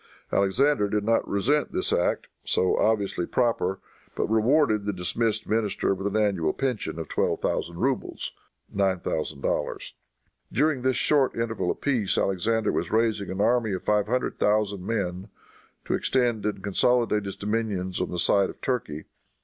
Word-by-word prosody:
Alexander 105 Hz, +3 st, +2 dB
did 105 Hz, 0 st, 0 dB
not 115 Hz, +2 st, +1 dB
resent 135 Hz, +9 st, +1 dB
this -, -, 0 dB
act, -, -, +1 dB, 0.2 s
so 95 Hz, -, +1 dB
obviously 100 Hz, -5 st, +1 dB
proper, 115 Hz, -6 st, 0 dB, 0.4 s
but -, -, 0 dB
rewarded 110 Hz, -1 st, +2 dB
the 105 Hz, -, 0 dB
dismissed 110 Hz, +4 st, -1 dB
minister 105 Hz, -3 st, +1 dB
with 95 Hz, +1 st, -3 dB
an 100 Hz, +1 st, -1 dB
annual 95 Hz, -7 st, +1 dB
pension 125 Hz, -10 st, -2 dB
of 80 Hz, -2 st, -5 dB
twelve -, -, 0 dB
thousand 85 Hz, 0 st, -2 dB
rubles 130 Hz, +6 st, -2 dB, 0.4 s
($9,000). 95 Hz, -7 st, -1 dB, 0.6 s
During 145 Hz, +2 st, +1 dB
this 130 Hz, 0 st, +1 dB
short 140 Hz, 0 st, +2 dB
interval 115 Hz, -1 st, -1 dB
of -, -, -3 dB
peace 120 Hz, -9 st, +1 dB
Alexander 110 Hz, +4 st, +1 dB
was -, -, -2 dB
raising 110 Hz, -3 st, +1 dB
an 95 Hz, +2 st, -2 dB
army 115 Hz, -2 st, +2 dB
of 95 Hz, -, -4 dB
five 105 Hz, -1 st, +2 dB
hundred 125 Hz, +3 st, -1 dB
thousand 105 Hz, -2 st, +1 dB
men, 95 Hz, -3 st, -2 dB, 0.6 s
to -, -, -1 dB
extend 120 Hz, -5 st, +1 dB
and 100 Hz, -2 st, -3 dB
consolidate 105 Hz, +1 st, +2 dB
his 100 Hz, -, -5 dB
dominions 100 Hz, -4 st, -2 dB
on 90 Hz, -, -1 dB
the 90 Hz, -, -4 dB
side 100 Hz, +3 st, +3 dB
of -, -, -10 dB
Turkey. 80 Hz, -, -2 dB
105 Hz, 155 wpm, -26 LUFS, 95-115 Hz, 0.6 s, side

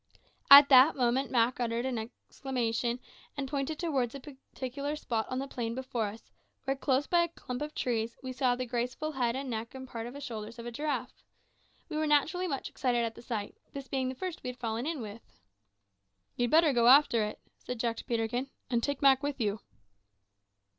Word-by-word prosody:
At 280 Hz, 0 st, +11 dB
that 265 Hz, +3 st, +8 dB
moment 255 Hz, +1 st, +1 dB
Mak 240 Hz, 0 st, +2 dB
uttered 235 Hz, 0 st, -1 dB
an 255 Hz, -3 st, -1 dB
exclamation, 240 Hz, +1 st, -3 dB, 0.4 s
and 275 Hz, -1 st, -2 dB
pointed 280 Hz, +2 st, -2 dB
towards 275 Hz, -8 st, -1 dB
a -, -, -6 dB
particular 275 Hz, +1 st, -6 dB
spot 230 Hz, -7 st, -2 dB
in 255 Hz, -, -1 dB
the 270 Hz, +1 st, -3 dB
plain 235 Hz, -3 st, -4 dB
before 255 Hz, -3 st, -2 dB
us, 220 Hz, +3 st, -10 dB, 0.3 s
where, 270 Hz, +1 st, 0 dB
close 270 Hz, 0 st, +1 dB
by 345 Hz, -1 st, +3 dB
a 340 Hz, -, +2 dB
clump 250 Hz, -6 st, -7 dB
of 300 Hz, +1 st, -5 dB
trees, 230 Hz, -2 st, -1 dB
we 260 Hz, 0 st, -4 dB
saw 255 Hz, -1 st, +2 dB
the 255 Hz, +1 st, -3 dB
graceful 250 Hz, +6 st, -2 dB
head 245 Hz, -4 st, 0 dB
and 270 Hz, +1 st, -4 dB
neck 230 Hz, 0 st, -4 dB
and 260 Hz, 0 st, -8 dB
part 230 Hz, -2 st, -6 dB
of 245 Hz, -, -9 dB
the -, -, -6 dB
shoulders 225 Hz, -3 st, -6 dB
of 235 Hz, -, -8 dB
a 240 Hz, -, -5 dB
giraffe. 265 Hz, -1 st, -3 dB, 0.7 s
We 310 Hz, -, -4 dB
were 310 Hz, 0 st, +1 dB
naturally 315 Hz, +5 st, +2 dB
much 275 Hz, -5 st, -3 dB
excited 240 Hz, -3 st, 0 dB
at 225 Hz, -, -4 dB
the -, -, -12 dB
sight, 220 Hz, -4 st, -4 dB, 0.2 s
this 275 Hz, -1 st, -7 dB
being 260 Hz, -1 st, -1 dB
the 260 Hz, -, -5 dB
first 365 Hz, +4 st, -5 dB
we 250 Hz, -, -4 dB
had 250 Hz, -, -7 dB
fallen 230 Hz, +2 st, -2 dB
in 320 Hz, -5 st, -2 dB
with. 215 Hz, +1 st, -8 dB, 1.1 s
"You'd 245 Hz, 0 st, 0 dB
better 315 Hz, 0 st, +5 dB
go 235 Hz, -1 st, +4 dB
after 255 Hz, -4 st, +6 dB
it," 210 Hz, -, -4 dB, 0.2 s
said 250 Hz, -2 st, -6 dB
Jack 230 Hz, -1 st, -1 dB
to -, -, -8 dB
Peterkin, 240 Hz, +3 st, -1 dB, 0.2 s
"and 235 Hz, -1 st, +2 dB
take 285 Hz, +2 st, -2 dB
Mak 270 Hz, -1 st, +6 dB
with 285 Hz, -1 st, -3 dB
you." 210 Hz, -2 st, 0 dB
255 Hz, 205 wpm, -30 LUFS, 235-280 Hz, 1.1 s, At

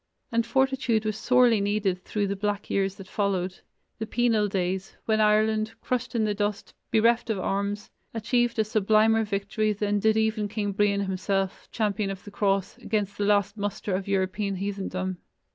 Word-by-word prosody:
And 230 Hz, 0 st, +1 dB
fortitude 265 Hz, -3 st, +1 dB
was 215 Hz, -1 st, -1 dB
sorely 245 Hz, -2 st, +4 dB
needed 200 Hz, -3 st, 0 dB
through 210 Hz, -1 st, -1 dB
the 200 Hz, 0 st, -2 dB
black 205 Hz, +1 st, -2 dB
years 195 Hz, -1 st, +1 dB
that 195 Hz, -, -10 dB
followed 190 Hz, -2 st, -1 dB, 0.4 s
the 220 Hz, -, -3 dB
penal 225 Hz, -3 st, +2 dB
days, 190 Hz, -1 st, -2 dB
when 220 Hz, -1 st, +2 dB
Ireland, 215 Hz, +1 st, +2 dB
crushed 250 Hz, -1 st, -2 dB
in 225 Hz, -, +2 dB
the 210 Hz, -1 st, +1 dB
dust, 205 Hz, 0 st, -3 dB, 0.2 s
bereft 230 Hz, +2 st, +3 dB
of 220 Hz, -, 0 dB
arms, 200 Hz, +2 st, -2 dB, 0.2 s
achieved 240 Hz, +1 st, 0 dB
a 220 Hz, -, +4 dB
sublimer 215 Hz, +1 st, +3 dB
victory 205 Hz, +1 st, -1 dB
than 205 Hz, 0 st, 0 dB
did 220 Hz, +1 st, +3 dB
even 220 Hz, -1 st, +1 dB
King 205 Hz, 0 st, -2 dB
Brian 200 Hz, 0 st, +2 dB
himself, 195 Hz, 0 st, -2 dB
champion 210 Hz, -2 st, 0 dB
of 195 Hz, -1 st, -6 dB
the 205 Hz, -, -10 dB
Cross, 195 Hz, +2 st, 0 dB
against 210 Hz, -3 st, -2 dB
the 205 Hz, -, +1 dB
last 205 Hz, 0 st, +2 dB
muster 205 Hz, -1 st, -3 dB
of 190 Hz, +1 st, -2 dB
European 195 Hz, +1 st, 0 dB
heathendom. 190 Hz, -1 st, -3 dB
205 Hz, 170 wpm, -26 LUFS, 195-220 Hz, 0.4 s, sorely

